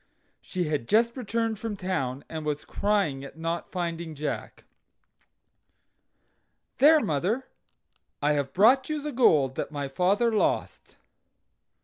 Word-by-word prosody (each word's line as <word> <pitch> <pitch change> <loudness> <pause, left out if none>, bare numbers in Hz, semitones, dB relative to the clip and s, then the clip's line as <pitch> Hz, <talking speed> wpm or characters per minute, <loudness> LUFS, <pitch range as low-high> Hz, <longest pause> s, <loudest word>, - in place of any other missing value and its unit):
She 185 -2 -3
had 150 -7 -2
just 230 +2 +3
returned 230 -3 -2
from 215 -2 -4
town, 140 -9 -3
and 160 -1 -6
was 150 -1 -3
crying 200 -10 0
at 140 - -10
not 165 +1 -3
finding 170 -3 -4
Jack. 150 +1 -5 2.2
"There, 305 +3 +7
mother, 190 - -1 0.7
I 150 +1 +2
have 140 -2 -1
brought 255 - +4
you 305 -1 -1
the 295 +1 -4
gold 155 - +4
that - - -3
my 145 -2 -3
father 195 - +1
lost." 215 - -1
180 Hz, 125 wpm, -27 LUFS, 150-230 Hz, 2.2 s, There